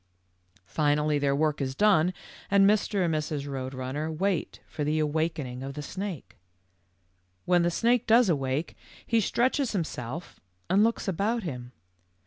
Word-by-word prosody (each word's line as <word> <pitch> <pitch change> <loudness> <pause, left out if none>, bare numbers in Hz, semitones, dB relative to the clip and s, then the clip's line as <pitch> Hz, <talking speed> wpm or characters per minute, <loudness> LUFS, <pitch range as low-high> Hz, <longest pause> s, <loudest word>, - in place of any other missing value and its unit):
"Finally 150 +3 +1
their 140 -1 +1
work 150 0 0
is 130 -1 -2
done, 185 -4 +4 0.4
and 195 0 +5
Mr. 205 -2 +2
and 165 - 0
Mrs. 150 -2 -2
Eoad 135 -2 -5
Runner 135 +5 -3
wait 185 +2 -1
for 155 -2 -5
the 150 +2 0
awakening 150 -4 -1
of 135 +1 -6
the 150 - -5
snake. 190 -1 -6 1.1
"When 180 -1 +4
the 170 - +2
snake 235 +6 +1
does 230 +1 +6
awake, 140 -1 -1 0.3
he 230 - +2
stretches 255 +3 +1
himself 160 - -5 0.3
and 200 +3 +5
looks 230 -1 0
about 205 +5 0
him. 125 -7 -6
160 Hz, 145 wpm, -27 LUFS, 145-200 Hz, 1.1 s, does